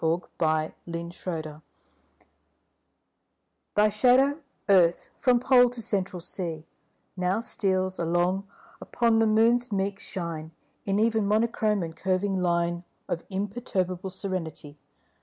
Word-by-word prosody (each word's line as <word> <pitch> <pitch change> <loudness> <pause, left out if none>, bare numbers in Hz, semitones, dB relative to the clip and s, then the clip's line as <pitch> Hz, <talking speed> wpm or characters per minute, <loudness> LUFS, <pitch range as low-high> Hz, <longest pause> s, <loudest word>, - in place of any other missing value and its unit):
AT - - +3
A 160 -2 0
LUNAR 170 0 -4
ECLIPSE 155 -4 -5 2.1
THY 210 +1 +5
shadow, 260 +7 +3 0.3
Earth, 180 -4 +4
from 250 -3 +4
Pole 250 -1 +5
to 245 0 -6
Central 195 -4 -2
Sea, 165 -2 -5 0.5
Now 185 +3 0
steals 190 -4 -1
along 175 +3 0 0.3
upon 230 -2 +2
the 225 - +4
Moon's 230 +3 +3
meek 195 0 -1
shine 165 -3 -5 0.3
In 195 0 +1
even 220 -1 +2
monochrome 215 -2 +1
and 165 -1 -6
curving 190 +2 0
line 170 0 0 0.2
Of 170 - -3
imperturbable 190 -2 -2
serenity. 165 -6 -5
190 Hz, 115 wpm, -27 LUFS, 170-215 Hz, 2.1 s, THY